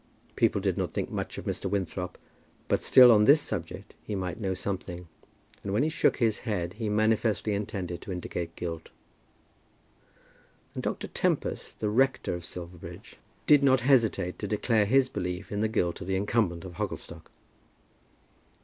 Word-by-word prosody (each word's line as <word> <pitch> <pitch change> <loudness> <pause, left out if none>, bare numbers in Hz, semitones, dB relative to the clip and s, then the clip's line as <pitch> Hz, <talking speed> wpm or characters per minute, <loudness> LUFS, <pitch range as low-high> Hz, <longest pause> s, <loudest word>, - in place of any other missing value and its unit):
People - - +2
did - - -1
not - - -2
think - - -3
much - - -4
of - - -7
Mr. 95 - -2
Winthrop; 90 -2 -3 0.5
but - - +1
still 125 -2 +8
on 105 -2 +5
this 145 +5 +7
subject 95 - -5
he 105 - -4
might 90 +1 -3
know 95 -3 -1
something, 90 -2 -5 0.6
and 100 - -3
when 110 - +2
he 155 - +1
shook 160 - +2
his 115 -4 +1
head 90 -7 -3
he 110 0 -3
manifestly 110 0 +1
intended 100 -4 -4
to - - -7
indicate 85 -1 -5
guilt. 85 -2 -5 1.8
And - - -4
Dr. - - -3
Tempest, - - -2
the 105 - +1
rector 130 +1 +1
of 85 -1 -5
Silverbridge, 90 -1 -9 0.3
did 145 -1 +6
not 130 -2 +4
hesitate 115 -8 +2
to 105 - -3
declare 105 0 +1
his 130 +3 +4
belief 90 -4 -4
in 105 0 -1
the 110 - +2
guilt 90 -6 -1
of 95 - -6
the 95 - 0
incumbent 95 -3 0
of 85 -2 -9
Hogglestock. - - -5
100 Hz, 165 wpm, -28 LUFS, 90-110 Hz, 1.8 s, still